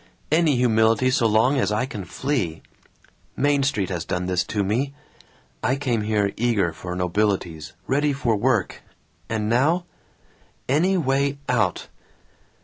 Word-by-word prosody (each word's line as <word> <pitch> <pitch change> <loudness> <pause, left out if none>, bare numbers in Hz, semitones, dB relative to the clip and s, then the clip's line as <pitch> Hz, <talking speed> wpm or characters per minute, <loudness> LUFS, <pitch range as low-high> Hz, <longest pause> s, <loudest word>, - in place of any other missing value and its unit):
Any 155 -2 +3
humility 115 0 +3
so 120 -2 +3
long 115 +6 +3
as 100 -4 +1
I 105 +4 0
can 105 -7 -7
flee. 105 - -2 0.7
Main 145 0 +2
Street 105 -10 0
has 85 -2 -2
done 90 +1 -2
this 90 0 0
to 105 -2 -1
me. 130 +8 -1 0.7
I 130 - +1
came 130 -5 -1
here 105 -2 0
eager 105 -8 +1
for 90 +3 -6
nobilities, 90 -3 -1
ready 145 +2 +1
for 125 -5 0
work, 110 -1 0 0.5
and 110 -2 -1
now 150 +10 +2 0.8
Any 175 +8 +2
way 140 -2 +1
out. 125 -2 0
115 Hz, 140 wpm, -23 LUFS, 100-135 Hz, 0.8 s, Any